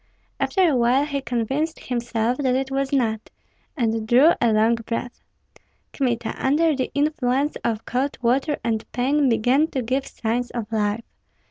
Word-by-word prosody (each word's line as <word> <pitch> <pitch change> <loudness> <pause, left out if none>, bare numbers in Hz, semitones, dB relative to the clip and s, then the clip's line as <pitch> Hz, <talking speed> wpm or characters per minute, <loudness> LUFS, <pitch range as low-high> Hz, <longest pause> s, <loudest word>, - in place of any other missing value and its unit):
After 380 -2 +2
a 300 - +2
while 250 +3 +3
he 280 -2 -3
convinced 265 +6 -2
himself 240 -1 -1
that 260 -3 +1
it 265 0 -2
was 270 0 -1
not, 225 -6 0 0.5
and 225 -3 0
drew 260 +8 +6
a 235 - +3
long 220 +2 +3
breath. 230 +1 -4 0.7
Kmita, 235 -4 -1
under 305 +3 +3
the 260 -1 -2
influence 285 -1 0
of 225 -1 -2
cold 260 +3 -1
water 265 +5 +1
and 220 -2 -1
pain, 275 +3 +2
began 245 +7 +3
to 265 -6 -3
give 260 +4 -1
signs 240 +2 -2
of 230 -3 -5
life. 210 +1 0
250 Hz, 155 wpm, -23 LUFS, 230-275 Hz, 0.7 s, drew